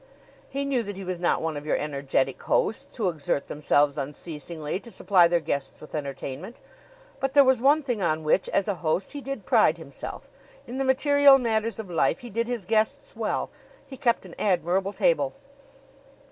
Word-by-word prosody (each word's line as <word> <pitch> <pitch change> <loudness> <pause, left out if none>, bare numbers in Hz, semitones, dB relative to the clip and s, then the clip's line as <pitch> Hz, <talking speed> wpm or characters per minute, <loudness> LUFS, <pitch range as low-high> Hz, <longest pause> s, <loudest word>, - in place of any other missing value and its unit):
He 280 +1 -3
knew 270 -3 +1
that 205 -3 -6
he 195 - -6
was 185 -1 -4
not 175 - +1
one 160 -1 -2
of 145 - -5
your 150 - 0
energetic 140 -2 -1
hosts 275 +5 0
who 220 -6 0
exert 150 -4 -2
themselves 145 -1 +2
unceasingly 150 +3 -5
to 235 - -13
supply 185 -4 +4
their 175 0 +2
guests 140 -4 -3
with 155 - -13
entertainment; 140 - -5 0.6
but 270 +1 -2
there 285 - +9
was 260 -3 +3
one 290 +4 +4
thing 245 -6 -2
on 160 -3 0
which, 155 +5 +2
as 195 - +1
a 205 - +1
host, 165 +4 0
he 285 - -6
did 275 0 -6
pride - - +4
himself - - -8 0.4
in 255 +3 -6
the - - +1
material 280 +1 +6
matters 230 -2 -1
of 220 -3 -6
life 175 +9 +1
he 240 -2 -9
did 230 +3 -1
his 240 -6 -3
guests 225 - 0
well; - - -2 0.3
he 270 - -10
kept 235 -5 +1
an 175 - -11
admirable 190 0 +1
table. - - +1
195 Hz, 190 wpm, -26 LUFS, 155-255 Hz, 0.6 s, there